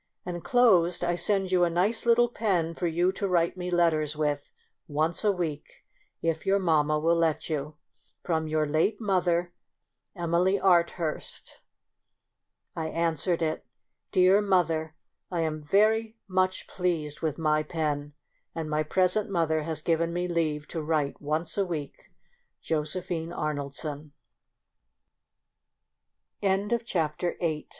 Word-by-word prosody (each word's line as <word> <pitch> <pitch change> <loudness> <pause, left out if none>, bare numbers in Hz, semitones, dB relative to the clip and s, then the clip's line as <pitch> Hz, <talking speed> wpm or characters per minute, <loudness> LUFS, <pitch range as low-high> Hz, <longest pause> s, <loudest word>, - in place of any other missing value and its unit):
Inclosed 180 -1 +3
I 175 0 +1
send 190 +2 0
you 180 -1 +4
a 175 - +3
nice 200 +8 0
little 240 +1 +5
pen 190 -8 0
for 175 +1 -2
you 175 +3 +2
to 200 +1 -3
write 170 -2 +1
me 180 -1 -4
letters 160 -4 +2
with 145 -2 -2 0.4
once 155 +6 -1
a 210 - +4
week, 160 -5 -5 0.4
if 165 -1 0
your 195 +1 +3
mamma 155 -5 +2
will 165 +2 +3
let 165 -1 0
you. 150 0 -3 0.5
From 160 -2 -1
your 155 0 +1
late 160 +8 +1
mother, 180 -4 +1 0.6
Emily 175 +3 +1
Arthurst. 170 -3 0 1.2
I 160 -1 -2
answered 165 +1 0
it: 155 0 -1 0.3
— - - -56
Dear 185 +2 +5
mother, 165 -5 +1 0.2
— - - -57
I 175 -2 0
am 155 -1 -2
very 215 +7 +2
much 185 0 0
pleased 165 -5 -2
with 155 -3 -1
my 155 -2 +2
pen, 150 -2 -3 0.4
and 160 -2 -4
my 150 0 +1
present 185 +6 +1
mother 165 -4 +1
has 155 0 -3
given 165 0 +1
me 175 +1 -1
leave 155 -4 -1
to 165 - -4
wri 150 -2 0
170 Hz, 120 wpm, -27 LUFS, 155-185 Hz, 1.2 s, little